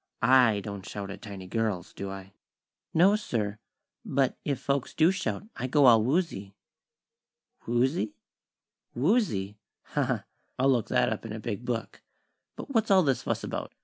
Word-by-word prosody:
I 120 -4 +5
don't 100 -1 -6
shout 100 0 -6
at 100 - -9
tiny 100 -4 -8
girls, 105 -3 -2
do 100 - -5
I?" 95 0 -9 0.6
"No, 185 +5 +5
sir; 110 - -2 0.4
but 135 -1 +1
if 140 -2 -1
folks 140 -2 -2
do 165 +3 +5
shout, 190 +1 -3
I 130 - -3
go 145 +2 +4
all 115 -3 +7
woozy." 125 - -1 1.1
"Woozy? 120 -1 +1 0.8
Woozy? 120 - +1 0.3
Ha, 145 - +2
ha! 125 -6 -1 0.3
I'll 135 +2 +4
look 120 -4 +1
that 120 - +2
up 110 - -7
in 115 -2 -6
a 110 - -5
big 110 +1 -5
book. 120 -2 -4 0.5
But - - -8
what's 225 -2 +2
all 190 -2 +6
this 135 -4 +1
fuss - - -2
about? - - -5
120 Hz, 160 wpm, -28 LUFS, 105-140 Hz, 1.1 s, all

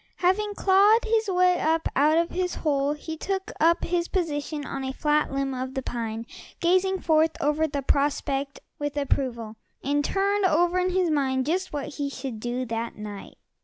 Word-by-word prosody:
Having 405 +3 +1
clawed 405 +5 +4
his 445 -1 +1
way 360 -1 +3
up 320 +1 +1
out 300 +3 +4
of 335 0 +1
his 365 -1 -1
hole 285 -2 0
he 320 +2 -6
took 385 +3 -3
up 335 +2 +3
his 345 0 0
position 300 -4 -2
on 270 -1 -4
a 265 - -2
flat 300 +2 +1
limb 275 0 -1
of 260 +1 -5
the 265 - -2
pine, 230 -2 -4 0.3
gazing 370 +2 +2
forth 320 0 +2
over 300 +2 +1
the 280 -2 -3
prospect 280 0 0 0.2
with 290 0 -3
approval, 235 -6 -2 0.3
and 290 +2 +1
turning 400 +4 +1
over 350 +3 +2
in 365 0 +1
his 365 -2 +1
mind 265 -3 +1
just 370 +5 -1
what 290 -2 -4
he 285 -1 -3
should 260 -4 -6
do 245 +3 -3
that 230 0 -4
night. 210 -1 -8
300 Hz, 180 wpm, -26 LUFS, 270-360 Hz, 0.3 s, clawed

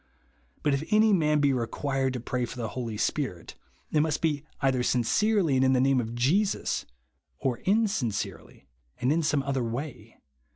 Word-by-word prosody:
But 145 - +2
if 140 +2 0
any 215 0 +5
man 150 -4 +3
be 140 -1 +3
required 135 +2 -1
to 125 - -3
piay 125 0 -2
for - - -9
the 115 -3 -3
Holy 115 -4 -4
Spirit, 110 - -2 0.4
it 155 - +2
must 150 0 +1
be 150 -3 0 0.2
either 135 -2 +1
sincerely 160 - +2
and 130 - +3
in 130 0 +4
the 130 - +3
name 135 0 +3
of 115 0 -6
Jesus, 175 - +1 0.5
or 125 - -1
in 220 +4 +3
sincerely 100 - -4 0.3
and 125 - +1
in 165 +2 +2
some 150 -3 +1
other 135 -2 -1
way. 125 +5 -6
135 Hz, 175 wpm, -27 LUFS, 125-155 Hz, 0.5 s, any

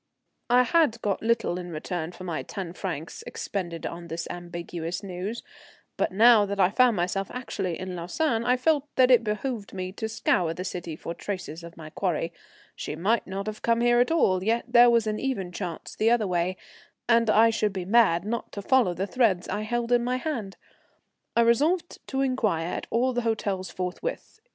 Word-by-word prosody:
I 250 +1 +6
had 290 -5 +2
got 200 -2 0
little 225 -5 +1
in 180 -1 -7
return 165 +1 -4
for 180 - -11
my 170 -4 -3
ten 185 -5 -6
francs 170 -4 -5
expended 175 -4 -4
on 170 0 -6
this 165 0 -4
ambiguous 175 0 -5
news, 195 +4 -5 0.5
but - - 0
now 220 +2 +6
that 200 0 -4
I 185 0 +4
found 250 0 +4
myself 185 +3 -1
actually 195 -9 -4
in 185 -1 -5
Lausanne 225 - -1
I 250 +1 +3
felt 295 +2 +1
that 255 0 +5
it 240 -2 +6
behoved 215 0 -3
me 185 -1 -4
to 220 +3 -4
scour 180 -7 +1
the 180 - -4
city 175 -3 -5
for 165 - -6
traces 175 -4 -6
of 170 0 -11
my 155 -1 -9
quarry. 170 -3 -1 0.4
She - - -5
might 205 +9 +1
not 195 +1 -4
have 215 0 -5
come 230 0 +2
here 240 0 +4
at 245 - +3
all, 190 - +2
yet 230 +3 +1
there 240 0 +7
was 235 -2 +3
an 215 0 -2
even 220 -10 -2
chance 175 -3 -6
the 220 - +2
other 235 -2 +3
way, 180 0 0 0.5
and 230 -1 +4
I 225 +2 +6
should 215 -2 0
be 190 -2 -4
mad 195 -4 +4
not 235 +2 -3
to 200 - -6
follow 240 -7 +3
the 190 +3 -1
threads 205 -5 +1
I 205 +2 -2
held 235 +2 -2
in 240 -1 +4
my 250 +1 0
hand. 245 -9 -4 0.8
I - - +6
resolved 300 +10 +2
to 270 0 -1
inquire 225 -11 +1
at - - -4
all 255 +2 +1
the 245 - 0
hotels 205 -5 -1
forthwith. 185 - -5
205 Hz, 195 wpm, -26 LUFS, 180-235 Hz, 0.8 s, there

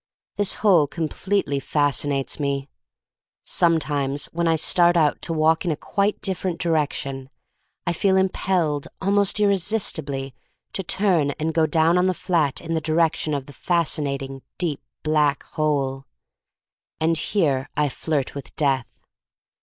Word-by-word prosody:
This 205 -1 +1
hole 175 -8 +5
completely 165 0 -1
fascinates 145 0 0
me. 140 -1 -1 0.8
Sometimes 145 -4 +1
when 170 0 0
I 165 - +3
start 175 +2 +3
out 150 -3 +2
to - - -4
walk 160 0 +2
in 175 - -1
a 155 - +1
quite 200 +6 -1
different 185 -3 -2
direction, 140 -5 -1 0.6
I 175 - 0
feel 190 +2 +2
im 190 0 +3
pelled 165 -8 -1
almost 200 +1 +2
irresistibly 175 - 0 0.4
to - - -2
turn 180 -5 +2
and 160 +1 -1
go 160 0 +3
down 165 +3 +3
on 180 - +3
the 185 - +1
flat 160 -8 0
in 165 -1 -4
the 160 - 0
direction 160 -1 +1
of 140 -2 -4
the 145 - -12
fascinating, 140 -5 -1 0.2
deep 165 -6 -1 0.2
black 150 -2 +2
hole. 135 -3 -1 0.9
And 165 +1 +2
here 145 -6 0
I 150 - +3
flirt 145 0 -2
with 140 -2 -9
Death. 135 -5 +1
160 Hz, 140 wpm, -23 LUFS, 140-175 Hz, 0.9 s, hole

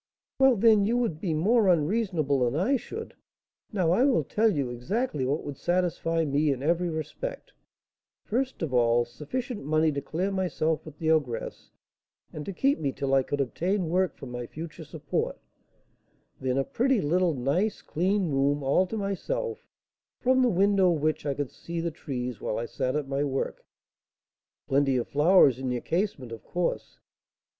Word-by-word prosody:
"Well, 265 -2 +6
then, 215 -1 +5
you 235 +2 +2
would 225 -11 -1
be 165 -5 -1
more 210 +7 +3
unreasonable 170 -4 +2
than 125 +1 +1
I 200 - +2
should. 430 - -6 0.6
Now 185 -6 +1
I 210 +8 +4
will 270 -2 +3
tell 220 +1 +2
you 140 -8 -1
exactly 150 - -2
what 145 +4 -1
would 145 -2 -6
satisfy 165 -2 0
me 145 +1 +2
in 135 -1 -3
every 170 +3 +1
respect: 165 - -5 0.7
first 255 -2 -2
of 145 -5 -3
all, 120 -1 +3
sufficient 225 - -5
money 155 +2 +2
to 140 -1 -3
clear 180 +8 -2
myself 175 -4 -1
with 155 -1 -10
the 160 +1 +1
ogress, 145 -7 -1 0.6
and 150 - -5
to - - -2
keep 275 +9 +1
me 140 -3 -1
till 135 0 -2
I 135 - +5
could 145 +2 -3
obtain 175 +7 -1
work 185 +2 +1
for - - -9
my 120 -1 -6
future 160 +3 -8
support; 155 -1 -3 1.0
then 130 0 -1
a 135 - +2
pretty, 250 - +1
little, 175 +1 +1
nice, 165 - 0
clean 185 +1 0
room, 140 +1 +1
all 140 +8 +3
to 225 - -4
myself, 445 - -3 0.5
from 260 +1 +3
the 250 - +4
window 195 -1 +3
of 155 -3 -2
which 155 -1 0
I 140 - 0
could 145 -2 -3
see 170 0 -6
the 170 0 -2
trees 125 -6 -5
while - - -2
I 115 - -2
sat 130 +2 -2
at 150 -2 -1
my 140 +1 -1
work." 135 -2 -3 1.0
"Plenty 135 -1 +2
of 120 - -2
flowers 145 -4 +5
in 130 -1 -3
your 125 -1 -2
casement, 165 - -2
of 115 - -8
course?" 175 -1 -3
160 Hz, 175 wpm, -27 LUFS, 140-200 Hz, 1.0 s, Well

